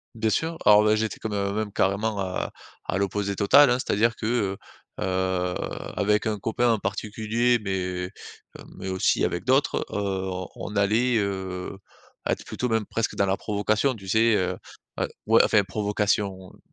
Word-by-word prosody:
Bien 110 0 0
sûr, 160 +9 -1
alors, 105 0 +7
ben, 110 0 +4
j'étais 110 0 -2
quand 110 - -4
mê 100 -1 -1
même 105 -1 -2
carrément 100 +2 0
à 95 -1 -3 0.3
à - - -1
l'opposé 100 0 -1
total, 130 +9 +6
hein, 125 - +3
c'est-à-dire 115 -1 +1
que, - - -6
heu, 105 -5 0 0.5
heu, 95 -1 0 0.4
avec 105 +1 +2
un 110 -2 -1
copain 115 +3 +1
en 110 - +1
particulier, 110 +4 0
mais, 95 -2 -2 0.7
heu, - - -12
mais 95 - -6
aussi 95 0 +2
avec 85 - -2
d'autres, 130 +3 +2
heu, 95 -2 -2
on 105 - -7
allait, 115 +4 +2
heu, 95 -2 -3 0.5
être - - -1
plutôt 125 - -3
même 110 -2 +1
presque 115 +2 -2
dans 100 - +2
la 95 0 0
provocation 105 +5 0
tu 95 -3 -12
sais? 110 +3 +4
Heu, 90 -3 0 0.5
et - - +1 0.2
ouais, - - +6
enfin, 105 - +4
provocation, 100 -2 -1
heu, - - -16
mmh, - - -23
105 Hz, 175 wpm, -25 LUFS, 95-110 Hz, 0.7 s, alors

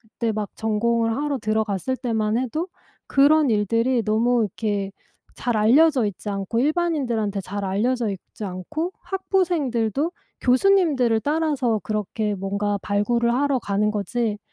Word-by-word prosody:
그때 225 0 -3
막 210 -1 -3
전공을 225 +1 0
하러 290 -1 -1
들어갔을 215 +1 -1
때만 225 -4 -1
해도 260 +7 -2 0.4
그런 290 +1 +4
일들이 230 +3 +1
너무 230 +3 +2
이렇게 205 -1 -2 0.5
잘 240 -3 -1
알려져 260 +4 +4
있지 205 +1 -6
않고, 200 +4 -2
일반인들한테 270 - 0
잘 200 +2 -5
알려져 225 +5 0
있지 195 +2 -8
않고 310 - -4
학부생들도 325 - 0 0.3
교수님들을 260 - +3
따라서 285 -8 0
그렇게 210 0 -2
뭔가 200 +2 -1
발굴을 235 +4 +1
하러 275 +1 +1
가는 205 +1 0
거지 210 +2 -1
230 Hz, 310 characters per minute, -23 LUFS, 210-275 Hz, 0.5 s, 그런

